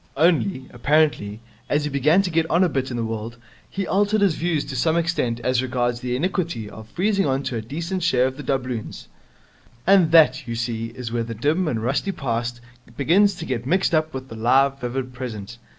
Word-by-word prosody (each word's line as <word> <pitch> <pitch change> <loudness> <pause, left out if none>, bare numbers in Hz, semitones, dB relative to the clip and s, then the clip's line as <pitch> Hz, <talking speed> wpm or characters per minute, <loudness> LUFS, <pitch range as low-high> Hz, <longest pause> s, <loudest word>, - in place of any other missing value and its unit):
Only, 135 - +2
apparently, 120 -5 +1 0.3
as 145 0 +1
he 150 - -1
began 150 +8 +3
to 180 - -2
get 160 0 +1
on 170 +3 +4
a 180 - +3
bit 135 -3 -2
in 120 - -4
the 115 - -1
world, 115 +1 -5 0.3
he 195 0 -3
altered 205 +3 +1
his 195 -5 +4
views 160 -2 -1
to 130 - -6
some 160 +6 +2
extent 160 -9 0
as 125 +1 +1
regards 120 -2 -1
the 125 0 -2
iniquity 170 - -2
of 110 +1 -11
freezing 195 - +1
on 135 +1 0
to 125 - -3
a - - -3
decent 170 - -4
share 130 -7 +3
of 130 0 -2
the 145 - -7
doubloons. 130 -4 -3 0.8
And 185 -4 +5
that, 155 -4 +5
you 115 - -3
see, 115 -1 -2
is 115 0 -7
where 120 0 -1
the 115 0 -6
dim 155 - +1
and 115 -7 -1
rusty 140 +11 0
past 120 -5 -3 0.4
begins 190 +8 +4
to - - -7
get 125 -1 -3
mixed 185 +3 +2
up 155 0 +2
with 130 0 -6
the 115 - -9
live, 135 +4 +3
vivid 125 +1 -3
present. 115 -3 -7
135 Hz, 210 wpm, -23 LUFS, 120-165 Hz, 0.8 s, And